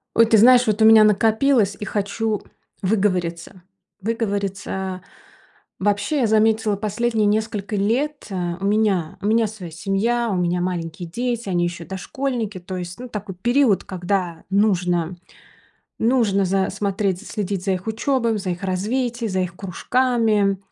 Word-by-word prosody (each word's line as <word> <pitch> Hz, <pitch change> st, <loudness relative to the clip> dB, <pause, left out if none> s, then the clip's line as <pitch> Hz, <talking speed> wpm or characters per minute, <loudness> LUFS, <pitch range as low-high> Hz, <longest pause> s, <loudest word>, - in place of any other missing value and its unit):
Ой, 230 Hz, -, +6 dB
ты 220 Hz, 0 st, +4 dB
знаешь, 245 Hz, +3 st, +6 dB
вот 215 Hz, 0 st, +1 dB
у -, -, +7 dB
меня 220 Hz, -1 st, +8 dB
накопилось 220 Hz, 0 st, +3 dB
и 210 Hz, -, -4 dB
хочу 210 Hz, +2 st, -2 dB, 0.4 s
выговориться. 185 Hz, -3 st, -1 dB, 0.4 s
Выговориться. 200 Hz, -3 st, -3 dB, 0.8 s
Вообще, 205 Hz, +9 st, 0 dB
я 240 Hz, -, +2 dB
заметила, 220 Hz, 0 st, +2 dB
последние 215 Hz, +2 st, 0 dB
несколько 210 Hz, 0 st, -1 dB
лет, 260 Hz, +9 st, -1 dB
э, 180 Hz, -3 st, -2 dB
у -, -, -2 dB
меня 200 Hz, -6 st, +1 dB
у -, -, -5 dB
меня 225 Hz, +1 st, +3 dB
своя 195 Hz, -5 st, -9 dB
семья, 210 Hz, +7 st, 0 dB
у -, -, 0 dB
меня 180 Hz, 0 st, 0 dB
маленькие 175 Hz, -1 st, -4 dB
дети, 235 Hz, +2 st, -3 dB
они 175 Hz, -2 st, +1 dB
ещё 175 Hz, -1 st, -4 dB
дошкольники. 220 Hz, +2 st, -4 dB
То, 185 Hz, +1 st, -7 dB
ну, -, -, -3 dB
есть 175 Hz, 0 st, -7 dB
такой 205 Hz, -2 st, -5 dB
период, 240 Hz, +2 st, +2 dB
когда 180 Hz, -2 st, -2 dB
нужно 180 Hz, -4 st, +1 dB, 0.8 s
нужно 225 Hz, -5 st, +2 dB
за 190 Hz, +1 st, +1 dB
смотреть, 200 Hz, -2 st, -1 dB
за 210 Hz, -, -13 dB
следить 200 Hz, -3 st, -3 dB
за 195 Hz, -, +1 dB
их 185 Hz, 0 st, -3 dB
учёбой, 230 Hz, 0 st, 0 dB
за 190 Hz, -3 st, -3 dB
их 180 Hz, +3 st, -6 dB
развитие, 230 Hz, +5 st, -1 dB
за 190 Hz, -1 st, -1 dB
их 180 Hz, -1 st, -4 dB
кружками. 215 Hz, 0 st, +1 dB
205 Hz, 150 wpm, -22 LUFS, 185-225 Hz, 0.8 s, меня